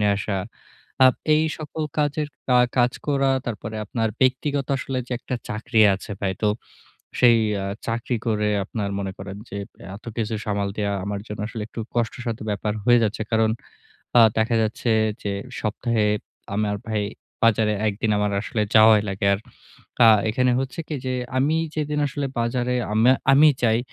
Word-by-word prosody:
নিয়ে 105 -1 +3
আসা। 100 -1 -2 0.7
আ - - +10 0.3
এই 155 +1 +3
সকল 155 0 -5 0.2
কাজের 150 0 0 0.2
কা 125 -1 +5 0.2
কাজ 125 0 +4 0.2
করা 135 -1 +2 0.2
তারপরে 110 -1 -5
আপনার 115 +1 -1
ব্যক্তিগত 135 +2 +1
আসলে 130 0 -3
যে 125 - -5
একটা 125 - -5
চাকরি 110 +1 0
আছে 95 - -9
ভাই। 95 -2 0
তো 105 - +4 0.7
সেই 120 -2 +6 0.2
আ - - -3 0.2
চাকরি 120 +2 -1
করে 105 -2 +1 0.2
আপনার 100 0 -3
মনে 95 -1 -3
করেন 95 0 -7
যে 100 - -6 0.4
এত 105 - -16
কিছু 110 -1 -1
সামাল 100 -1 -1
দেওয়া 100 -1 -1
আমার 100 0 -3
জন্য 105 -2 -6
আসলে 115 -2 -5
একটু 115 - -7
কষ্টসাধ্য 120 0 -2
ব্যাপার 105 +1 -1
হয়ে 120 +1 +6
যাচ্ছে। 110 0 -1
কারণ 110 0 +3 0.7
আ - - +9 0.2
দেখা 110 +1 +2
যাচ্ছে 110 +2 -1 0.3
যে 100 - -1 0.3
সপ্তাহে 110 +1 0 0.5
আমার 105 -1 0
ভাই 110 -2 0 0.4
বাজারে 110 -1 +3
একদিন 105 +2 -1
আমার 105 0 +1
আসলে 110 0 -2
যাওয়াই 110 -1 +7
লাগে। 95 +1 -2
আর 100 - -1 0.7
আ - - +9 0.2
এখানে 125 +3 +2
হচ্ছে 135 +3 -4
কি 155 - -3
যে 130 - -1 0.2
আমি 145 +4 +2 0.2
যেদিন 150 -1 -1
আসলে 140 +1 -3
বাজারে 120 +1 0 0.2
আমে 115 +4 +5 0.2
আমি 145 +3 +7 0.2
যাই 115 -1 +4
115 Hz, 165 wpm, -23 LUFS, 105-125 Hz, 0.7 s, আ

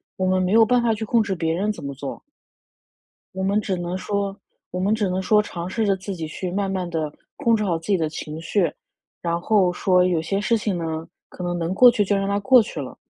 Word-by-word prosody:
我 185 - -1
们 185 0 +2
没 185 0 0
有 225 +1 +7
办 245 +2 +3
法 230 - +3
去 220 +1 -4
控 225 +1 +2
制 200 -2 -2
别 165 -2 -1
人 195 +6 0
怎 - - -10
么 140 - -4
做。 140 0 -6 1.1
我 190 - -4
们 200 +2 +2
只 190 -2 -2
能 175 +1 -3
说 200 0 -2 0.4
我 180 - -3
们 195 +3 +2
只 215 -3 0
能 185 +1 -1
说 210 +2 +4
尝 175 -3 -6
试 220 +2 0
着 195 -1 +3
自 190 +1 -6
己 165 -3 -5
去 180 +3 -5
慢 195 +1 -1
慢 185 -2 -2
地 155 -3 -2 0.3
控 235 -5 +3
制 215 - -1
好 175 -5 0
自 165 - -13
己 200 -2 +3
的 160 -2 -1
情 155 0 -6
绪， 175 +2 +1 0.5
然 170 0 -1
后 190 -1 +3
说 180 0 +3
有 175 -3 +1
些 195 +5 -1
事 230 +3 +2
情 205 -4 -2
呢， 160 -1 -4 0.2
可 180 - -8
能 175 0 -2
能 170 +2 -1
过 245 +5 +8
去 220 -3 +2
就 200 +1 +1
让 195 0 0
它 200 0 +1
过 255 +3 +6
去 180 - -6
了。 130 - -8
190 Hz, 275 characters per minute, -23 LUFS, 170-210 Hz, 1.1 s, 过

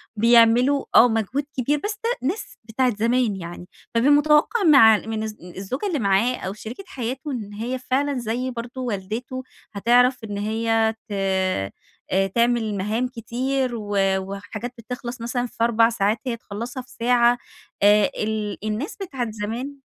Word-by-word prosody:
بيعملوا 235 +5 +5
آه 245 - +9
مجهود 225 +6 -1
كبير، 285 +4 +1
بس 420 0 -3
ده 460 - +1 0.2
ناس 375 +9 -4
بتاعة 235 +1 0
زمان 230 0 +1
يعني، 175 -1 -8 0.3
فبيبقى 250 +5 +4
متوقع 300 +9 +4
مع 265 - +7
من 220 0 -4
الز 215 -1 -5 0.2
الزوجة 250 - -3
اللي 335 -7 -1
معاه 205 +4 +2
أو 190 -4 -5
شريكة 225 - -8
حياته، 265 0 -4
إن 210 -5 -5
هي 240 +5 -3
فعلًا 270 +2 0
زي 245 +2 -2
برضو 245 +2 -6
والدته، 230 +4 -4 0.3
هتعرف 245 +4 +3
إن 205 -2 -5
هي 225 +1 +1
ت - - -11 1.0
آآ 195 +1 +2
تعمل 235 -3 +2
مهام 215 +6 -1
كتير، 250 +2 -2
و 205 -2 -4 0.2
وحاجات 205 +5 -6
بتخلص 240 +1 -7
مثلًا 245 +1 -2
في 230 - -3
4 230 -1 +4
ساعات، 215 -1 0
هي 235 -2 -1
تخلّصها 235 +3 -6
في 250 - -23
ساعة، 240 0 +4 0.5
آآ 205 0 +6
ال 215 -1 -2
الناس 215 +8 -3
بتاعة 260 - -3
زمان 230 +7 -5
235 Hz, 155 wpm, -23 LUFS, 215-255 Hz, 1.0 s, آه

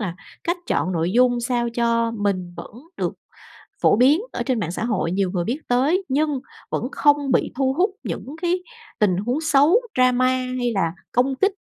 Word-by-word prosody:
là 185 -5 -3 0.3
cách 345 +1 0
chọn 185 - 0
nội 170 +2 0
dung 245 0 +3
sao 240 0 0
cho 230 -1 +1
mình 195 -5 -2
vẫn - - -9 0.2
được - - -2 0.7
phổ - - +5
biến 275 - +4
ở - - -2
trên 255 -4 0
mạng 170 -4 -2
xã 180 - -4
hội, 195 -8 -1
nhiều 190 -1 0
người 175 -3 -1
biết 250 - -2
tới, 285 +10 +2
nhưng 290 -1 0 0.3
vẫn - - -2
không 290 -2 +2
bị - - +2
thu 265 0 +1
hút 360 +7 +2
những - - -5 0.2
cái 355 +1 +1 0.4
tình 190 -4 +3
huống 245 +9 -1
xấu, 320 - +4
drama, 255 0 +3 0.3
hay 245 -1 0
là 165 -4 0 0.2
công 260 +3 +1
kích? 395 +9 +2
245 Hz, 190 wpm, -22 LUFS, 205-285 Hz, 0.7 s, phổ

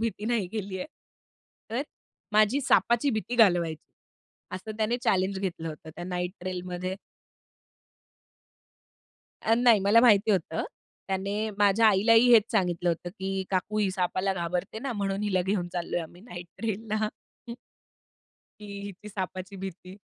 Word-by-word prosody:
भीती 225 -2 -2
नाही 230 -5 +1
गेली 200 -3 -4
आहे. - - -4 0.8
तर, 245 +5 -1 0.5
माझी 215 +6 +4
सापाची 240 +1 +3
भीती 230 +2 -3
घालवायची, 175 -8 +3 0.7
असं 215 +4 -7
त्याने 225 +2 +1
चॅलेंज 190 +1 +1
घेतलं 175 -4 -3
होतं 155 0 -9
त्या 175 - -6
नाईट 180 0 -2
ट्रेलमध्ये. 185 0 -4 2.5
अ, 225 - +4
नाही. 235 -4 +5
मला 205 +4 +5
माहिती 220 -3 +5
होतं. 165 -4 0 0.5
त्याने 200 +3 -1
माझ्या 205 +2 +5
आईलाही 225 +4 +5
हेच 225 -2 +8
सांगितलं 175 -4 +1
होतं, 170 +1 -1
की 190 -1 -3
"काकू 195 +3 -1
ही 205 -2 +2
सापाला 185 +1 0
घाबरते 180 +4 -3
ना, 265 +2 -3
म्हणून 200 -2 -2
हिला 185 -3 +1
घेऊन 185 -1 -1
चाललोय 175 -1 -2
आम्ही 170 +2 -10
नाईट 175 -7 -9
ट्रेलला." 215 0 -2 1.5
की 210 - -9 0.2
हिची 200 +2 -10
सापाची 190 -1 -5
भीती 190 0 -8
195 Hz, 135 wpm, -27 LUFS, 180-220 Hz, 2.5 s, हेच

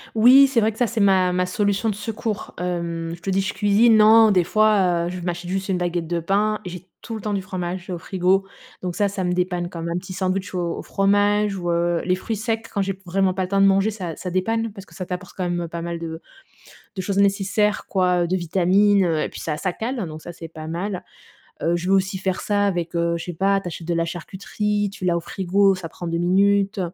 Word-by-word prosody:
Oui, 255 +5 +8
c'est 255 -4 +2
vrai 220 - +2
que 215 - -15
ça, 245 -1 +2
c'est 225 -1 -2
ma 190 -2 +4
ma 180 0 +1
solution 205 +3 0
de 210 - -2
secours. 215 0 -4
Hem, 170 -2 -3
je - - -24
te 195 - -4
dis, 195 +1 +2
je 195 +1 -3
cuisine 215 +2 +4
non, 220 0 +7
des 180 -3 +3
fois, 190 -5 +3
heu, - - -2
je 180 +1 -5
m'achète 175 0 -4
juste 190 +1 -2
une 190 - 0
baguette 175 -2 -2
de 170 0 -1
pain 210 +5 +1
et 180 - -6
j'ai 180 +1 -9
tout 230 - -7
le 220 - -6
temps 210 0 -2
du 190 - -2
fromage 185 -1 -5
au 175 - -4
frigo, 190 +2 +1 0.3
donc 180 -2 -4
ça, 205 - +2
ça 195 -1 -3
me 180 - 0
dépanne, 180 -1 -1
comme 170 -1 -5
un 170 - -1
petit 185 +1 -7
sandwich 185 0 -2
au 175 -2 -2
au - - -5
fromage 205 +1 +2
ou 175 -2 -3
heu, 170 0 +1
les 180 - +1
fruits 220 +4 -4
secs 225 +1 -2
quand 200 - 0
j'ai 195 0 -2
vraiment 190 +1 +1
pas 190 - 0
le 180 - -4
temps 195 0 +2
de - - +6
manger, 195 +3 +3
ça, 180 -6 -5
ça 180 - -6
dépanne 225 +5 0
parce 195 -2 -11
que - - -17
ça 185 - -5
t'apporte 180 0 -6
quand 185 - -2
même, 175 0 -1
heu, 170 - -4
pas 170 0 -6
mal 170 -1 -4
de 160 -1 -6 0.8
de - - -1
choses 195 +1 -2
nécessaires, 200 +1 +1
quoi, 180 -2 +2
heu, - - -1
de 185 - 0
vitamines, 190 +3 +3
heu, 160 -2 +1
et - - -3
puis - - -9
ça, 155 -2 -3
ça 185 +4 -2
cale, 235 +7 -4
hein, 185 - -3
donc 155 0 -8
ça, 175 - -8
c'est 165 -1 -9
pas 155 -1 -9
mal. 180 +3 -4 0.6
Heu, 170 +1 +2
je 175 +1 -3
vais 195 - +5
aussi 190 0 0
faire 190 0 -2
ça 205 -1 +1
avec, 175 -3 -2
heu, 170 0 +1
je 165 - -6
sais 175 - -5
pas, 195 +4 +2
tu 190 - -8
achètes 165 0 -8
de 170 - 0
la 165 0 +1
charcuterie, 200 +4 -3
tu 185 - -6
l'as 170 -1 +2
au - - 0
frigo, 195 +3 +2
ça 185 -3 -6
prend 175 - -9
2 170 0 -1
minutes. 200 +3 +2
185 Hz, 265 wpm, -22 LUFS, 175-205 Hz, 0.8 s, Oui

